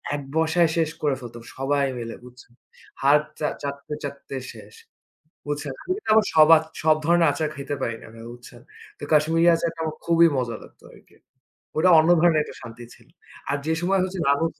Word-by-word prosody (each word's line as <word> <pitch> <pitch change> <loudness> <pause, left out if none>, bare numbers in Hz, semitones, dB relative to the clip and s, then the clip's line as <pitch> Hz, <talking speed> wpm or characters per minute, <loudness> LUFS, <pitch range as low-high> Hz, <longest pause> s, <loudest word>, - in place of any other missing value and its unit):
এক 145 - -5
বসায় 160 +1 +2
শেষ 160 -2 +1
করে 145 -3 +1
ফেলত 120 -1 -10 0.2
সবাই 140 +1 0
মিলে 115 -1 -6
বুঝছেন, 125 -1 -16 0.5
হাত 145 +2 +4 0.2
চা 150 - 0 0.2
চাটতে, 140 +1 -6
চাটতে 140 -1 -7 0.2
শেষ, - - -14 0.7
বুঝছেন। 145 -2 -4
আমি - - -5
কিন্তু 420 - -8
আবার 220 - +4
সবার 155 0 +7 0.2
সব 155 -1 +5
ধরনের 170 -1 +4
আচার 150 +1 -2
খাইতে 140 +1 -5
পারি 115 -2 -2
না - - -12
আমি, 115 - -14
বুঝছেন। 120 0 -14 0.4
তো - - -11
কাশ্মীরি 160 +3 +3
আচারটা 165 0 -3
আমার 155 -1 -4
খুবই 170 0 +5
মজা 120 -3 -2
লাগতো - - -19
আরকি। - - -21 0.6
ওটা 180 +3 +4
অন্য 160 +2 +2
ধরনের 165 -3 +4
একটা - - -11
শান্তি 115 +1 -10
ছিল। 120 - -23 0.4
আর 145 - 0
যে 160 - +1
সময় 190 +2 +1
হচ্ছে 185 0 -4
নানু 140 +3 +2
150 Hz, 185 wpm, -23 LUFS, 140-165 Hz, 0.7 s, সবার